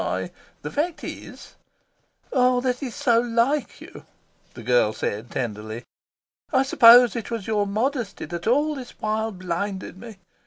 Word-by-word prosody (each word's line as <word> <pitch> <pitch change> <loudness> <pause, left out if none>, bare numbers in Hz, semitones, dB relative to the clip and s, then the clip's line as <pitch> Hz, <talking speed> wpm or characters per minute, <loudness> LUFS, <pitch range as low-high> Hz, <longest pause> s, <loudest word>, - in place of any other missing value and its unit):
I - - -3 0.3
the - - -5
fact 315 +3 -2
is - - -9 0.4
" - - -21
"Ah, 250 -1 +3
that 250 -1 -1
is 255 -5 -5
so 235 -2 +3
like 240 +5 0
you!" - - -13 0.5
the 120 - -9
girl 120 -2 +3
said 110 +3 -4
tenderly. 110 -1 -5 0.7
"I 265 -3 +3
suppose 245 -2 +7
it 230 - -4
was 230 -4 -4
your 210 -2 0
modesty 230 +1 -2
that 170 +3 -6
all 295 +6 +2
this 260 -4 -9
while 220 +1 -1
blinded 185 +1 -4
me. 225 -2 -10
230 Hz, 155 wpm, -24 LUFS, 180-250 Hz, 0.7 s, suppose